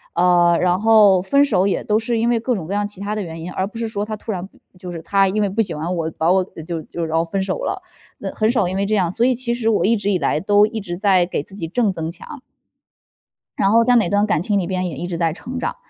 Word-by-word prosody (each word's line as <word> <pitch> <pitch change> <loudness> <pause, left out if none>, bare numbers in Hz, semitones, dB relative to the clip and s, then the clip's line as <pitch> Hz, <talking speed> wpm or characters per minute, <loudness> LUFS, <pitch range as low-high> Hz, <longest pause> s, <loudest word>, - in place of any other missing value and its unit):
呃， 175 -1 +4
然 180 +1 +2
后 210 -4 +5
分 280 +9 +3
手 195 -9 +2
也 200 - 0
都 210 0 +1
是 230 0 -1
因 235 +1 +1
为 235 - +2
各 245 +2 -1
种 170 -7 -4
各 195 - -4
样 205 0 0
其 205 -2 -8
它 205 +1 -3
的 210 - -3
原 165 -1 -8
因， 180 - -6
而 190 - -2
不 220 +3 -8
是 230 - -2
说 205 -1 -3
他 215 - -4
突 215 +1 -6
然 185 -1 -4 0.3
就 180 0 -8
是 165 - -6
他 195 +3 +2
因 210 +3 0
为 200 - +1
不 210 +4 -5
喜 195 -7 +1
欢 165 +4 -3
我， 160 -1 -2
把 165 +2 +3
我 190 0 +3 0.2
就 165 -3 -4
就 170 - -6
然 160 0 -1
后 165 - +1
分 190 +3 -2
手 190 -1 -3
了， - - -3 0.4
那 - - -5
很 215 - +1
少 220 -6 +2
因 185 - -3
为 200 +1 0
这 215 - -1
样， 180 -4 +1
所 235 +5 +1
以 255 - +3
其 240 -1 -1
实 225 -2 0
我 215 - +2
一 230 +3 +3
直 205 0 -1
以 185 - +1
来 145 +1 0
都 205 +3 +4
一 225 0 -5
直 175 -3 -5
在 190 -3 +4
给 175 - -3
自 195 - -14
己 165 -5 -5
正 215 +2 +1
增 165 -2 -4
强。 255 - -11 1.2
然 195 - +2
后 230 +1 +5
在 245 +1 +3
每 215 -7 +3
段 205 +1 +2
感 165 -7 0
情 200 +1 +1
里 175 - -2
边 185 -1 -2
也 155 - -7
一 175 +6 -5
直 170 -2 -4
在 165 -2 0
成 250 +7 -7
长。 - - -3
195 Hz, 320 characters per minute, -20 LUFS, 175-215 Hz, 1.2 s, 后